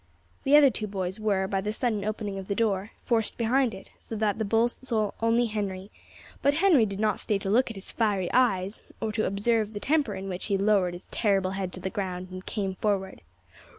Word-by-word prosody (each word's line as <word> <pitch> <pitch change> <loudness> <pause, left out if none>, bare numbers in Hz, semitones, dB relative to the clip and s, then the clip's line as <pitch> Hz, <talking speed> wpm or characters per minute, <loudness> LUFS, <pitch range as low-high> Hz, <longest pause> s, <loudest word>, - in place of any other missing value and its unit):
The 285 +2 +7
other 285 -3 +7
two 215 - -4
boys 190 0 -3
were, 200 -3 +1
by 195 0 -1
the 210 +2 -2
sudden 220 -2 -1
opening 205 -2 -3
of 190 - -8
the 200 - -1
door, 205 -2 0 0.2
forced 225 -3 +1
behind 245 +2 +2
it, 190 - -13
so 225 - -7
that 215 -1 0
the - - +1
bull 225 +3 +3 0.5
only 230 +1 +3
saw 220 - -5
Henry; 195 -2 -3 0.5
but 285 +1 +3
Henry 320 - +5
did 200 0 -5
not 215 0 +1
stay 210 - 0
to 195 0 -3
look 245 +4 +3
at 225 - -7
his 195 - -5
fiery 205 -5 0
eyes, 200 -5 +2 0.2
or 220 - -2
to 215 0 0
observe 215 +2 0
the 205 - -4
temper 280 -5 +1
in 190 0 -6
which 180 -1 -3
he 200 -2 +1
lowered 195 -3 +2
his 175 - -11
terrible 195 -4 +1
head 190 -1 -3
to - - -6
the 190 +1 -4
ground 185 -4 -4
and 185 0 -8
came 195 -3 -2
forward. 195 -3 -1
205 Hz, 220 wpm, -27 LUFS, 190-225 Hz, 0.5 s, The